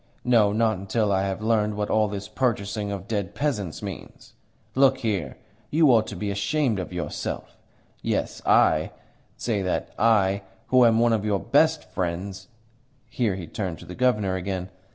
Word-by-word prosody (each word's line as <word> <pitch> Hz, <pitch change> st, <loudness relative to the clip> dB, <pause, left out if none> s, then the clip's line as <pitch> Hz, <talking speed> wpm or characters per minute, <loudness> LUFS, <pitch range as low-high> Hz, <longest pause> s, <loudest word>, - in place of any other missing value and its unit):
No, 115 Hz, -5 st, +4 dB
not 110 Hz, -2 st, +1 dB
until 100 Hz, +2 st, 0 dB
I 95 Hz, -1 st, +2 dB
have 95 Hz, +2 st, -4 dB
learnt 105 Hz, -2 st, +1 dB
what 105 Hz, 0 st, -2 dB
all 110 Hz, -1 st, +3 dB
this 100 Hz, -1 st, -5 dB
purchasing 105 Hz, -3 st, -1 dB
of 100 Hz, -2 st, -5 dB
dead 100 Hz, -5 st, -3 dB
peasants 105 Hz, -, -2 dB
means. 100 Hz, -4 st, -9 dB, 0.4 s
Look 135 Hz, 0 st, +4 dB
here. 100 Hz, -, -2 dB, 0.3 s
You 155 Hz, -2 st, +5 dB
ought 110 Hz, -2 st, +3 dB
to 105 Hz, -, -6 dB
be 100 Hz, +2 st, -3 dB
ashamed 110 Hz, +3 st, 0 dB
of 90 Hz, -, -5 dB
yourself. 90 Hz, -1 st, -5 dB, 0.5 s
Yes, -, -, -2 dB
I -, -, +3 dB, 0.4 s
say 110 Hz, -4 st, -1 dB
that 90 Hz, -1 st, -2 dB
I 100 Hz, -3 st, +3 dB, 0.3 s
who 130 Hz, -1 st, +6 dB
am 115 Hz, -1 st, +5 dB
one 120 Hz, 0 st, +4 dB
of 110 Hz, -2 st, 0 dB
your 105 Hz, -2 st, +1 dB
best -, -, +3 dB
friends." 95 Hz, +2 st, -4 dB, 0.6 s
Here 110 Hz, -6 st, 0 dB
he 90 Hz, -3 st, -6 dB
turned 90 Hz, 0 st, -4 dB
to -, -, -12 dB
the 90 Hz, -, -8 dB
Governor 105 Hz, -5 st, +1 dB
again. 95 Hz, 0 st, -4 dB
105 Hz, 170 wpm, -25 LUFS, 95-115 Hz, 0.6 s, who